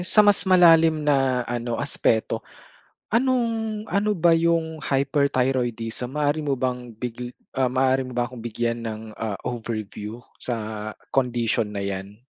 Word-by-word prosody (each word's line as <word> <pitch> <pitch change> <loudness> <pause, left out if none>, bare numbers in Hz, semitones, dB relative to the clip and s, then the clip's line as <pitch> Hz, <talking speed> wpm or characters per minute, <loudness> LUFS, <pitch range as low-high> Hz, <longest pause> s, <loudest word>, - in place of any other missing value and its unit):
sa 210 +4 +4
mas 205 -1 +4
malalim 165 -4 +6
na 135 -4 +2
ano 120 0 -3
aspeto. 110 0 0 0.7
Anong, 230 -3 +1
ano 210 +1 +1
ba 170 0 +4
'yong 165 -1 +1
hyperthyroidism 130 -4 0
maaari 150 +1 +1
mo 145 -2 0
bang 125 -2 -3
big 125 +1 -5 0.2
maaari 130 0 +2
mo 125 - -8
ba 120 - +2
akong 125 -2 -9
bigyan 115 +1 -2
ng, 110 -1 -4 0.2
ah, 110 -3 -2
overview 110 -1 -5 0.2
sa 125 - -2 0.6
condition 120 -5 +1
na 100 - -2
'yan? 100 +2 -5
130 Hz, 130 wpm, -24 LUFS, 115-160 Hz, 0.7 s, malalim